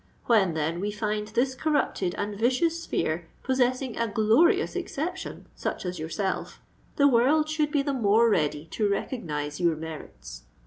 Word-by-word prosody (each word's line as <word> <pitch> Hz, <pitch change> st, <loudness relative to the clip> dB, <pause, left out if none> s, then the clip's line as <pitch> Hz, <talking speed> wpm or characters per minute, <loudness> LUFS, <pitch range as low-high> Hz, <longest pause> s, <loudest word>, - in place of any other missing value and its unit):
When, 195 Hz, -8 st, +3 dB
then, 160 Hz, +2 st, -1 dB
we 205 Hz, +3 st, -1 dB
find 210 Hz, 0 st, -2 dB
this 245 Hz, +5 st, 0 dB
corrupted 260 Hz, -, 0 dB
and 205 Hz, 0 st, -3 dB
vicious 260 Hz, +10 st, +1 dB
sphere 160 Hz, -, -2 dB, 0.2 s
possessing 255 Hz, -1 st, 0 dB
a 230 Hz, -, +1 dB
glorious 245 Hz, -, +3 dB
exception 360 Hz, +6 st, -4 dB
such -, -, -4 dB
as 180 Hz, -1 st, -4 dB
yourself, 190 Hz, +5 st, -3 dB, 0.4 s
the 285 Hz, -, +5 dB
world 280 Hz, +5 st, +4 dB
should 310 Hz, -1 st, 0 dB
be 290 Hz, -2 st, +1 dB
the 280 Hz, 0 st, -1 dB
more 230 Hz, -2 st, +4 dB
ready 150 Hz, -7 st, +1 dB
to 210 Hz, -2 st, 0 dB
recognise 150 Hz, -, -3 dB
your 170 Hz, -2 st, +2 dB
merits. 150 Hz, -, -9 dB
220 Hz, 150 wpm, -27 LUFS, 175-270 Hz, 0.4 s, the